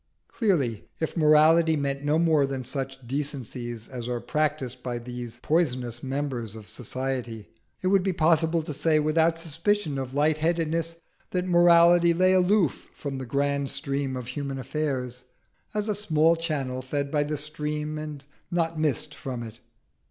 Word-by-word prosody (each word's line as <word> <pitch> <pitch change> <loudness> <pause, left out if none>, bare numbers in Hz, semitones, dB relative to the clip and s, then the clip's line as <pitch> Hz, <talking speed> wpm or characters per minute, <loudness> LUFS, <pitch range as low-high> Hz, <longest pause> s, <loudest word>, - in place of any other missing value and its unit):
Clearly 145 - 0
if 160 - -2
morality 160 +1 +5
meant 140 -1 -2
no 150 +2 +2
more 160 -4 +3
than 135 -1 -4
such 135 0 -5
decencies 125 -4 -4
as 120 -2 -6
are 120 -1 -2
practised 150 -4 -1
by 125 -1 -3
these 120 -1 -7
poisonous 125 -7 0
members 130 -5 -3
of 110 -2 -10
society, 125 -3 -4 0.3
it - - +1
would 195 -1 +4
be 190 +1 0
possible 165 -1 +2
to 155 - -4
say, 155 +2 +2
without 160 +2 +2
suspicion 165 -1 -1
of 130 0 -5
light 150 +1 +2
headedness, 165 0 0 0.3
that 180 0 -1
morality 170 -1 +6
lay 185 +2 +4
aloof 185 -3 +2
from 135 -2 -5
the 130 - -6
grand 140 +1 0
stream 140 -2 -1
of 125 -1 -6
human 140 +1 -4
affairs, 130 -3 -3 0.5
as 210 0 0
a 210 - +1
small 165 -5 +3
channel 140 -6 -2
fed 140 +2 -3
by 150 - +2
the 150 +1 -1
stream 150 +1 -2
and 150 -2 -7 0.2
not 165 -2 -1
missed 150 -6 0
from 130 -4 -5
it. 110 -2 -10
150 Hz, 160 wpm, -26 LUFS, 130-165 Hz, 0.5 s, morality